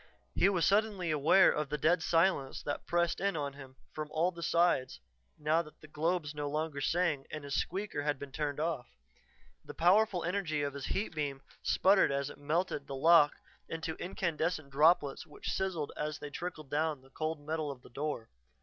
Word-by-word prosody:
He 195 Hz, -, +4 dB
was 180 Hz, -4 st, +2 dB
suddenly 200 Hz, -4 st, +2 dB
aware 155 Hz, +5 st, +5 dB
of 150 Hz, -2 st, -2 dB
the 150 Hz, -, -1 dB
dead 165 Hz, +4 st, +3 dB
silence 165 Hz, -5 st, +1 dB
that 145 Hz, -, -4 dB
pressed 170 Hz, 0 st, +1 dB
in 195 Hz, -3 st, 0 dB
on 140 Hz, -2 st, -3 dB
him 135 Hz, -2 st, -12 dB, 0.2 s
from 155 Hz, -1 st, -4 dB
all 165 Hz, +4 st, +1 dB
sides 170 Hz, -, +2 dB, 0.4 s
now 155 Hz, +2 st, +2 dB
that 155 Hz, -2 st, -14 dB
the 155 Hz, -, -13 dB
globes 155 Hz, 0 st, -1 dB
no 145 Hz, -1 st, -3 dB
longer 150 Hz, -1 st, -2 dB
sang 165 Hz, -2 st, 0 dB
and 155 Hz, -2 st, -6 dB
his 140 Hz, 0 st, -5 dB
"squeaker" 190 Hz, +2 st, -2 dB
had 145 Hz, -1 st, 0 dB
been 140 Hz, 0 st, -8 dB
turned 145 Hz, 0 st, -2 dB
off. 155 Hz, -5 st, -2 dB, 0.8 s
The -, -, -10 dB
powerful 185 Hz, +1 st, +3 dB
energy 170 Hz, -5 st, -1 dB
of 140 Hz, -1 st, -2 dB
his 140 Hz, -1 st, -5 dB
heat 200 Hz, -2 st, -2 dB
beam 140 Hz, -3 st, -3 dB, 0.2 s
sputtered 190 Hz, -4 st, +4 dB
as 140 Hz, 0 st, -1 dB
it -, -, -14 dB
melted 150 Hz, 0 st, -1 dB
the 135 Hz, -, -5 dB
lock 155 Hz, +1 st, +6 dB, 0.4 s
into 160 Hz, 0 st, -3 dB
incandescent 165 Hz, -4 st, -2 dB
droplets 150 Hz, 0 st, +3 dB
which -, -, -5 dB
sizzled 180 Hz, -6 st, -2 dB
as 150 Hz, 0 st, -3 dB
they 145 Hz, 0 st, -8 dB
trickled 155 Hz, -4 st, -6 dB
down 150 Hz, -2 st, 0 dB
the 135 Hz, -, -20 dB
cold 155 Hz, +1 st, -3 dB
metal 155 Hz, +1 st, -3 dB
of 135 Hz, -3 st, -8 dB
the -, -, -15 dB
door. 140 Hz, -3 st, -4 dB
155 Hz, 185 wpm, -32 LUFS, 145-175 Hz, 0.8 s, lock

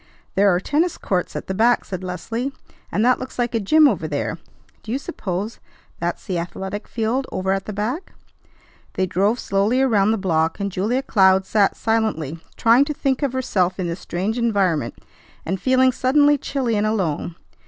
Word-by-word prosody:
"There 200 Hz, +1 st, +4 dB
are 175 Hz, -1 st, +3 dB
tennis 310 Hz, -, 0 dB
courts 180 Hz, -2 st, -2 dB
at -, -, -4 dB
the 190 Hz, -, -3 dB
back," 235 Hz, +5 st, +3 dB
said 185 Hz, -1 st, -6 dB
Leslie, 225 Hz, +9 st, -3 dB, 0.4 s
"and 215 Hz, -, +1 dB
that 250 Hz, 0 st, +4 dB
looks 255 Hz, -, -8 dB
like 245 Hz, -1 st, 0 dB
a 230 Hz, -, +1 dB
gym 305 Hz, +9 st, +5 dB
over 180 Hz, -, 0 dB
there. 155 Hz, +2 st, -3 dB, 0.4 s
Do 220 Hz, -, -7 dB
you 255 Hz, -, +1 dB
suppose 210 Hz, -, -4 dB, 0.4 s
that's 175 Hz, +1 st, -3 dB
the 180 Hz, -3 st, -1 dB
athletic 190 Hz, +4 st, -5 dB
field 240 Hz, +4 st, -1 dB
over 190 Hz, +1 st, -1 dB
at 195 Hz, 0 st, -1 dB
the -, -, -5 dB
back?" 220 Hz, -, -3 dB, 0.8 s
They 185 Hz, -, +1 dB
drove 195 Hz, +6 st, +1 dB
slowly 200 Hz, +6 st, +1 dB
around 215 Hz, -7 st, +3 dB
the 225 Hz, -, +2 dB
block, 165 Hz, -3 st, 0 dB
and 200 Hz, 0 st, -2 dB
Julia 220 Hz, +8 st, 0 dB
Cloud 190 Hz, -5 st, +4 dB
sat 205 Hz, -1 st, +2 dB
silently, 215 Hz, -9 st, -1 dB, 0.2 s
trying 235 Hz, +4 st, +5 dB
to 300 Hz, 0 st, -4 dB
think 270 Hz, -1 st, 0 dB
of 280 Hz, -3 st, 0 dB
herself 195 Hz, -8 st, 0 dB
in 185 Hz, -, -1 dB
this 170 Hz, +2 st, -3 dB
strange 200 Hz, +7 st, -2 dB
environment, 190 Hz, -, +1 dB, 0.5 s
and 190 Hz, +2 st, -2 dB
feeling 260 Hz, 0 st, +4 dB
suddenly 285 Hz, +4 st, +3 dB
chilly 265 Hz, -4 st, -1 dB
and 210 Hz, +1 st, +1 dB
alone. 175 Hz, -6 st, -1 dB
210 Hz, 185 wpm, -21 LUFS, 185-250 Hz, 0.8 s, gym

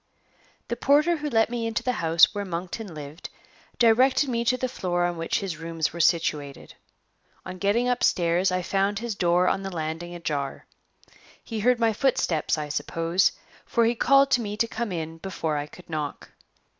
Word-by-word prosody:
THE 235 Hz, -, -2 dB
porter 295 Hz, +7 st, +3 dB
who 300 Hz, 0 st, -3 dB
let 225 Hz, -2 st, +2 dB
me 235 Hz, -1 st, -2 dB
into 225 Hz, -, -2 dB
the 250 Hz, -, +1 dB
house 165 Hz, +3 st, +5 dB
where 205 Hz, -1 st, -3 dB
Monkton 180 Hz, +1 st, -5 dB
lived 150 Hz, +2 st, -8 dB, 0.5 s
directed 255 Hz, +4 st, +4 dB
me 235 Hz, -1 st, 0 dB
to 255 Hz, +1 st, +2 dB
the 255 Hz, -, -1 dB
floor 175 Hz, -7 st, -1 dB
on 175 Hz, 0 st, -1 dB
which 165 Hz, +4 st, -1 dB
his 185 Hz, -5 st, -4 dB
rooms 165 Hz, -1 st, -3 dB
were 170 Hz, -, -7 dB
situated. 150 Hz, -4 st, 0 dB, 0.7 s
On 185 Hz, -, -7 dB
getting 210 Hz, +6 st, +1 dB
upstairs, 180 Hz, -7 st, +2 dB
I 185 Hz, 0 st, -1 dB
found 195 Hz, +2 st, 0 dB
his 235 Hz, +1 st, -3 dB
door 180 Hz, -1 st, +2 dB
on 195 Hz, -, +1 dB
the 195 Hz, -, -4 dB
landing 170 Hz, 0 st, -5 dB
ajar. 145 Hz, -5 st, -4 dB, 0.8 s
He 225 Hz, -2 st, -5 dB
heard 245 Hz, +3 st, +3 dB
my 225 Hz, -1 st, +2 dB
footsteps, 200 Hz, -, +1 dB
I 150 Hz, -1 st, -3 dB
suppose, 165 Hz, +4 st, 0 dB, 0.3 s
for 235 Hz, -1 st, +1 dB
he 230 Hz, -, +2 dB
called 275 Hz, +3 st, +4 dB
to 245 Hz, -, +3 dB
me 210 Hz, -1 st, -4 dB
to 230 Hz, -, +1 dB
come 230 Hz, -2 st, -4 dB
in 165 Hz, -1 st, -5 dB
before 165 Hz, -4 st, -3 dB
I 145 Hz, 0 st, -3 dB
could 180 Hz, +4 st, -15 dB
knock. 155 Hz, -3 st, -5 dB
185 Hz, 180 wpm, -25 LUFS, 165-230 Hz, 0.8 s, house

